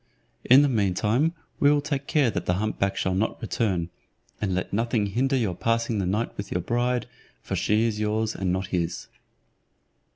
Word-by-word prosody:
In 135 +3 +7
the - - +4
mean 100 -8 +1
time 130 - +1 0.2
we 145 - +5
will 145 0 +4
take 140 -1 -3
care 145 -7 +3
that - - -4
the 90 - +2
hump 110 +3 -2
back 100 0 0
shall 95 - 0
not 100 +4 -1
return, 95 -7 -1 0.5
and 95 -3 0
let 90 - -3
nothing 115 0 +1
hinder 130 +7 0
your 110 -8 0
passing 115 +2 0
the 95 - -1
night 105 +5 -1
with 100 -1 -6
your 90 - 0
bride, 120 +3 0 0.4
for - - -3
she 105 +2 +2
is 110 -2 -1
yours 110 +1 0
and 95 -2 -1
not 95 +1 -1
his." 85 -1 -2
110 Hz, 195 wpm, -25 LUFS, 95-125 Hz, 0.5 s, In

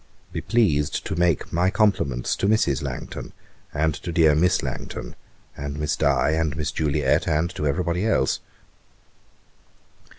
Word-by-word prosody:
'Be - - -4
pleased 85 -12 +1
to - - -3
make 85 -2 +1
my 90 +3 +3
compliments 95 - +1
to 100 - 0
Mrs. 105 -11 +2
Langton, - - -6 0.4
and 80 +1 +1
to 85 - -6
dear 80 -2 +5
Miss 90 +4 +2
Langton, 65 -1 -6 0.4
and 70 0 -5
Miss 75 -2 0
Di, 70 -1 +2
and 80 -2 0
Miss 75 -1 -1
Juliet, 75 -1 +1
and 80 +2 +1
to 75 - -2
every 80 +6 0
body 90 +5 0
else. 65 -12 +2
80 Hz, 145 wpm, -24 LUFS, 70-90 Hz, 0.4 s, dear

